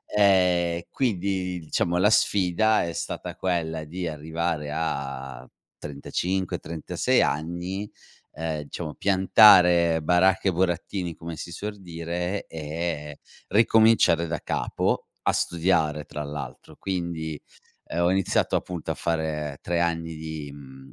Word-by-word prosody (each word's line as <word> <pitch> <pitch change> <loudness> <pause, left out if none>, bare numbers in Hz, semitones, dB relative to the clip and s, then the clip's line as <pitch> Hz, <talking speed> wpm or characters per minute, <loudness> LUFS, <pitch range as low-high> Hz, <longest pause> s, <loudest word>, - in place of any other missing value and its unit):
Ehm, 90 -4 +3
quindi, 95 -6 -1
diciamo, 85 +1 -1
la 95 +4 +4
sfida 105 0 +3
è 85 - -3
stata - - -5
quella 80 -4 -2
di 90 +3 -5
arrivare 80 0 -3
a 70 -5 -4 0.3
35-36 85 +3 -1
anni, 85 +6 -2 0.4
ehm, 80 -1 -4
diciamo, 80 -1 -5
piantare 90 -4 +6
baracche 90 +4 +3
e - - +2
burattini, 90 0 -1
come 80 0 -7
si 85 - -7
suor 105 +5 -6
dire 85 +2 -4
e, 75 -1 -5 0.3
ricominciare 110 -5 +4
da 85 0 -2
capo, - - -1 0.2
a - - +2
studiare 80 -4 +1
tra 75 - -6
l'altro. 70 -3 -8
Quindi, 85 -5 -4 0.4
uhm, 85 - -3
ho 85 +1 +3
iniziato 95 0 +1
appunto 90 -3 -4
a - - 0
fare 80 -3 -2
3 85 -1 -1
anni 80 -1 -1
di, 80 -2 -6
mhmm 65 -1 -13
85 Hz, 120 wpm, -25 LUFS, 80-90 Hz, 0.4 s, piantare